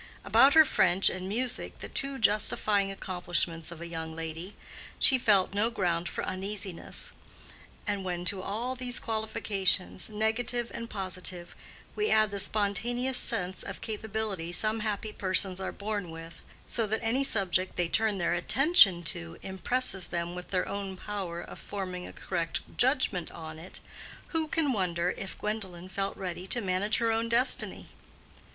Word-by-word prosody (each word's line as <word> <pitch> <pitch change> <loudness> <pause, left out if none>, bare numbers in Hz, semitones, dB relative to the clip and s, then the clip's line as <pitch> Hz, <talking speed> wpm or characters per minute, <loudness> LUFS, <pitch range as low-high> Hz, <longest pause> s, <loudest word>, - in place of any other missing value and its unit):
About 275 +2 +6
her 315 -1 +10
French 185 -7 +4
and 185 0 -4
music, 245 +5 -2
the - - -7
two 275 0 0
justifying 210 -2 +2
accomplishments 175 -4 -2
of 170 -1 -9
a - - -5
young 160 -1 -5
lady, 165 +4 -6 0.4
she 260 - +6
felt 200 -5 +4
no 210 +3 +2
ground 175 -6 0
for - - -4
uneasiness; 190 -1 -5 0.7
and 205 -2 -1
when 175 -1 -3
to 195 0 +4
all 225 +7 -2
these 250 -1 -3
qualifications, 215 -5 0
negative 225 +3 0
and 230 0 -5
positive, 185 -3 -3 0.4
we 425 0 +1
add 215 -1 +4
the 200 - -3
spontaneous 220 +6 0
sense 190 -5 -2
of - - -6
capability 215 -5 -3
some 215 +4 0
happy 210 0 -2
persons 185 0 +1
are - - -2
born 205 -3 -3
with, 165 0 -9 0.2
so 230 -2 0
that 220 +3 -1
any 245 +5 +2
subject 190 -6 +1
they 175 - +1
turn 215 +3 +2
their 175 -2 +1
attention 195 - +6
to 85 - -2
impresses 190 0 -1
them 170 0 -3
with 180 0 -7
their 185 -2 0
own 195 -1 -4
power 190 -4 -4
of - - -9
forming 185 -3 -5
a - - -8
correct 170 -3 -2
judgment 245 - +2
on 160 -1 -8
it, 180 +4 -4 0.5
who 320 -1 +1
can 300 -3 +1
wonder 180 -3 +1
if 190 - -7
Gwendolen 190 -4 -4
felt 195 +1 -2
ready 180 -1 -5
to 240 - +1
manage 200 +1 +1
her 230 0 +2
own 225 +1 0
destiny? 240 +3 +1
195 Hz, 160 wpm, -30 LUFS, 180-220 Hz, 0.7 s, her